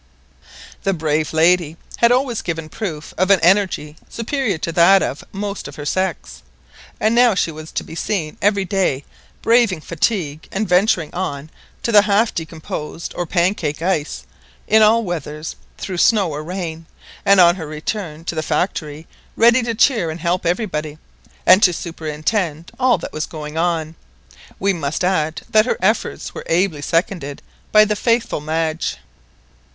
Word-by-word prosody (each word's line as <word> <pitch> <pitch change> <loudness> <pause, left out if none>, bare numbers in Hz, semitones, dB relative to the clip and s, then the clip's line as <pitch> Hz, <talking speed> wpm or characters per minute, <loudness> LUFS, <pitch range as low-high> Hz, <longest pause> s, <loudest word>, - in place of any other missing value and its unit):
The 195 -1 0
brave 155 -1 0
lady 165 0 +3 0.2
had 235 0 +4
always 250 -2 +1
given 165 -2 -4
proof 160 -8 -6
of 185 +1 +2
an 200 -2 +6
energy 175 -4 +2
superior 235 - -2
to 165 - -3
that 180 +4 +5
of 140 - -4
most 200 -3 -5
of 140 - -10
her 145 - -7
sex, 145 - -2 0.6
and 215 +1 +2
now 240 -3 +5
she 170 - 0
was 155 0 -10
to - - -2
be - - -11
seen 165 -2 -2
every 200 -1 +2
day 180 -9 0 0.4
braving 230 -8 +3
fatigue, 160 -3 -2
and 210 +2 -1
venturing 180 -3 +2
on 155 -4 -4 0.3
to 235 - 0
the 210 -2 +8
half 210 +2 +2
decomposed, 160 0 -6
or 175 - -3
"pancake" 170 -3 0
ice, 165 -5 -1 0.4
in 220 0 +5
all 225 +2 +5
weathers, 155 -4 -5 0.2
through 185 -3 -4
snow 200 -6 +3
or 150 +1 -5
rain, 165 -2 -5 0.4
and 200 -1 +5
on 175 0 +6
her 160 -4 -6
return 155 +1 -5
to - - -2
the 160 - -2
factory 155 -3 -2 0.3
ready 235 +2 +5
to 230 -1 -2
cheer 220 - +3
and 160 +2 -5
help 175 0 0
everybody, 155 -5 -2 0.5
and 185 +2 +7
to 185 - +6
superintend 165 +1 -3
all 255 -1 +4
that - - -8
was 155 - -3
going 150 -1 -7
on. 165 -2 0 0.6
We 200 +1 +1
must 160 -1 -3
add 160 -4 0
that 215 +2 +4
her - - 0
efforts 210 +5 -1
were - - -7
ably 165 -3 +1
seconded 165 -2 -2 0.3
by 215 0 +7
the 210 0 0
faithful 230 -6 0
Madge. 160 +1 -2
175 Hz, 160 wpm, -19 LUFS, 155-205 Hz, 0.6 s, the